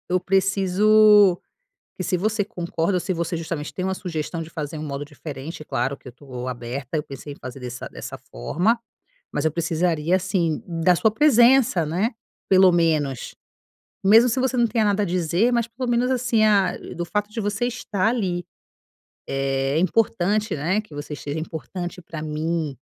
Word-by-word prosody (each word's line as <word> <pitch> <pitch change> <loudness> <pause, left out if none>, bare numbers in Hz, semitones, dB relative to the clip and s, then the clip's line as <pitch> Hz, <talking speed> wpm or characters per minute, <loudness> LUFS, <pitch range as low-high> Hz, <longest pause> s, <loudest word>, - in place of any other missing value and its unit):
Eu 185 +1 +2
preciso 195 +1 +4 0.6
que - - -4
se 185 - 0
você 210 +3 0
concorda 175 -3 -2
ou 180 - +1
se 185 +3 -2
você 170 -1 -2
justamente 160 -2 -4
tem 185 - -4
uma 190 0 0
sugestão 165 -3 -4
de 160 - -10
fazer 155 -1 -5
um 155 - -5
modo 140 -1 -4
diferente, 145 +1 -8
claro 135 0 -1
que 135 - -13
eu - - -10
tô 125 -1 -7
aberta. 125 +4 -5
Eu 150 - 0
pensei 140 +1 -9
em - - -20
fazer 130 +1 -9
dessa 125 0 -6
dessa - - -8
forma, 175 - 0 0.6
mas 145 - -1
eu 160 - +3
precisaria, 165 0 0
assim, 180 -4 0
da 170 +1 +2
sua 220 - +3
presença, 240 - +5
né. 180 +10 0 0.4
Pelo 190 -1 +6
menos, 155 -6 0 0.7
mesmo 225 +5 +6
se 240 - 0
você 260 0 0
não 240 - +4
tenha 225 0 +1
nada 205 0 +2
a - - 0
dizer, 180 +5 +1
mas 235 -1 +1
pelo 240 +2 -4
menos 240 +1 +2
assim, 245 -3 +2
ah, 200 -4 +3 0.2
do 175 0 -3
fato 210 +3 -2
de 225 +2 -5
você 205 +2 -1
estar 220 -5 -1
ali, 190 -7 -1 0.8
é 135 +1 0
importante, 210 +2 +1
né. 170 +8 0
Que 215 -8 -15
você 145 +1 -6
seja 145 +2 -5
importante 175 +3 -6
pra 165 -1 -7
mim, 155 -1 -2
175 Hz, 180 wpm, -23 LUFS, 155-210 Hz, 0.8 s, Pelo